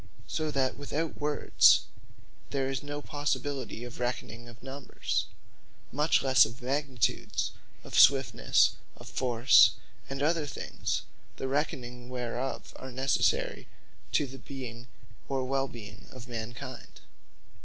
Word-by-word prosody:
So 155 Hz, -1 st, -2 dB
that 135 Hz, -3 st, 0 dB
without 150 Hz, +3 st, -3 dB
words, 150 Hz, 0 st, +5 dB, 0.7 s
there 135 Hz, -2 st, 0 dB
is 135 Hz, -, -2 dB
no 145 Hz, 0 st, -5 dB
possibility 145 Hz, -4 st, -2 dB
of 120 Hz, -1 st, -8 dB
reckoning 120 Hz, -1 st, -3 dB
of 115 Hz, -1 st, -15 dB
Numbers; 135 Hz, +1 st, -3 dB, 0.6 s
much 150 Hz, +2 st, +3 dB
lesse 130 Hz, -4 st, +7 dB
of 115 Hz, +4 st, -3 dB
Magnitudes, 130 Hz, -2 st, 0 dB, 0.3 s
of -, -, -12 dB
Swiftnesse, 135 Hz, +3 st, +5 dB, 0.3 s
of -, -, -12 dB
Force, 120 Hz, -1 st, +5 dB, 0.4 s
and 135 Hz, +1 st, -3 dB
other 160 Hz, -1 st, +1 dB
things, -, -, -3 dB, 0.3 s
the 135 Hz, -, -3 dB
reckonings 125 Hz, -3 st, -2 dB
whereof 125 Hz, +1 st, -4 dB
are 130 Hz, -, -8 dB
necessary 130 Hz, +1 st, +1 dB, 0.5 s
to 145 Hz, -, +3 dB
the 135 Hz, 0 st, -10 dB
being, 125 Hz, -3 st, -8 dB, 0.4 s
or 135 Hz, -2 st, 0 dB
well 135 Hz, +1 st, 0 dB
being 105 Hz, -5 st, -11 dB
of 130 Hz, -1 st, -11 dB
man 115 Hz, -1 st, -5 dB
kind. -, -, -9 dB
130 Hz, 125 wpm, -30 LUFS, 120-140 Hz, 0.7 s, lesse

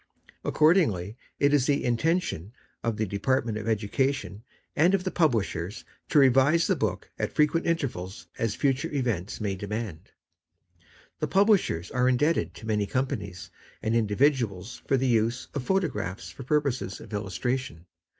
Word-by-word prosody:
Accordingly, 140 Hz, -, +3 dB, 0.2 s
it 140 Hz, 0 st, +3 dB
is 140 Hz, -3 st, +3 dB
the 145 Hz, -1 st, +2 dB
intention 120 Hz, -, 0 dB, 0.3 s
of 115 Hz, -2 st, -1 dB
the 110 Hz, -, 0 dB
Department 110 Hz, +2 st, 0 dB
of 110 Hz, -, -6 dB
Education 110 Hz, +1 st, -1 dB, 0.3 s
and 175 Hz, +6 st, +4 dB
of 185 Hz, -, -1 dB
the 185 Hz, -, -2 dB
Publishers 110 Hz, -, 0 dB, 0.2 s
to -, -, +2 dB
revise 135 Hz, +4 st, +5 dB
the -, -, +2 dB
book -, -, -2 dB
at -, -, -1 dB
frequent 150 Hz, +2 st, +2 dB
intervals 120 Hz, -, -2 dB
as 115 Hz, -2 st, 0 dB
future 140 Hz, +4 st, 0 dB
events 120 Hz, -10 st, -2 dB
may 105 Hz, -3 st, -1 dB
demand. 100 Hz, -2 st, -4 dB
n -, -, -30 dB, 1.1 s
The -, -, -1 dB
Publishers 195 Hz, -, +2 dB
are 125 Hz, 0 st, +2 dB
indebted 150 Hz, +6 st, +1 dB
to -, -, -10 dB
many 105 Hz, -2 st, 0 dB
companies, 100 Hz, -8 st, -3 dB, 0.3 s
and 110 Hz, +1 st, +1 dB
individuals 115 Hz, -2 st, +1 dB
for 135 Hz, -, +3 dB
the 130 Hz, -, 0 dB
use 115 Hz, +1 st, +1 dB
of 140 Hz, -, -2 dB
photo 190 Hz, +2 st, +2 dB
graphs 95 Hz, -, -5 dB
for 90 Hz, -, -11 dB
purposes 130 Hz, -8 st, -1 dB
of -, -, -12 dB
illustration. 105 Hz, -1 st, -3 dB
120 Hz, 150 wpm, -27 LUFS, 105-145 Hz, 1.1 s, revise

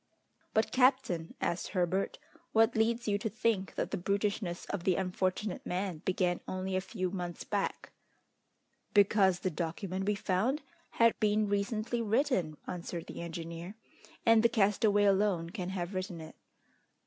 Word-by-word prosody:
"But, 220 Hz, 0 st, +2 dB
captain," 255 Hz, -11 st, +2 dB
asked 170 Hz, 0 st, -1 dB
Herbert, 185 Hz, +1 st, 0 dB, 0.4 s
"what 225 Hz, +1 st, +4 dB
leads 230 Hz, +2 st, +1 dB
you 205 Hz, -1 st, +2 dB
to 220 Hz, -, -2 dB
think 215 Hz, -3 st, 0 dB
that -, -, -2 dB
the -, -, -1 dB
brutishness 200 Hz, -1 st, -1 dB
of 180 Hz, -, -4 dB
the 185 Hz, -1 st, +3 dB
unfortunate 185 Hz, +2 st, -1 dB
man 180 Hz, -2 st, -2 dB
began 180 Hz, -1 st, +1 dB
only 185 Hz, 0 st, -2 dB
a 185 Hz, -, +1 dB
few 185 Hz, -1 st, -3 dB
months 175 Hz, -3 st, -4 dB
back?" 200 Hz, -2 st, -2 dB, 1.0 s
"Because 195 Hz, -3 st, +5 dB
the 185 Hz, -, 0 dB
document 185 Hz, +4 st, -3 dB
we 210 Hz, -, +2 dB
found 215 Hz, +9 st, 0 dB, 0.3 s
had 230 Hz, 0 st, +5 dB
been 210 Hz, 0 st, +2 dB
recently 215 Hz, +4 st, -1 dB
written," 220 Hz, -, +1 dB
answered 170 Hz, -1 st, -5 dB
the -, -, -7 dB
engineer, 170 Hz, +2 st, -6 dB, 0.5 s
"and 225 Hz, -1 st, +6 dB
the 235 Hz, -, +5 dB
castaway 205 Hz, -1 st, +3 dB
alone 195 Hz, -4 st, +2 dB
can 180 Hz, 0 st, -4 dB
have 185 Hz, 0 st, -3 dB
written 185 Hz, -2 st, -4 dB
it." 160 Hz, 0 st, -10 dB
195 Hz, 150 wpm, -32 LUFS, 180-215 Hz, 1.0 s, and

